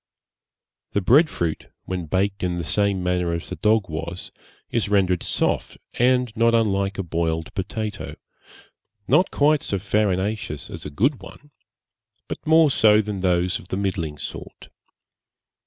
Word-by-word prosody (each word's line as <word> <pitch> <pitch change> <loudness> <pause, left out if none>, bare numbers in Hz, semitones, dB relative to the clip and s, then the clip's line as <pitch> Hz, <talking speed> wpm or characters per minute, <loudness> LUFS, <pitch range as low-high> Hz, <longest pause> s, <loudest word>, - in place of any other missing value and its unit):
The 100 - +1
bread 145 - +5
fruit, 85 -2 -3 0.2
when 90 -3 -4
baked 95 +4 0
in 90 -1 -1
the 85 - -3
same 100 +2 0
manner 90 -1 0
as 85 - -5
the - - -4
dog 110 -2 +2
was, 85 +3 -5 0.4
is 115 -3 0
rendered 95 -3 +2
soft, - - -1 0.2
and 125 -2 +2
not 115 0 +3
unlike 100 -3 +1
a 95 - -2
boiled 80 -1 -2
potato; 105 +2 -4 0.9
not 165 +9 +4
quite 150 0 +3
so 100 - -2
farinaceous 100 -4 -1
as - - -7
a - - -6
good 125 - 0
one, 145 0 -13 0.8
but - - -5
more 160 -2 +6
so 105 -4 +5
than 105 -2 -2
those 90 -1 +1
of - - -13
the 95 - -3
middling 85 -6 -2
sort. - - -8
100 Hz, 150 wpm, -23 LUFS, 90-110 Hz, 0.9 s, more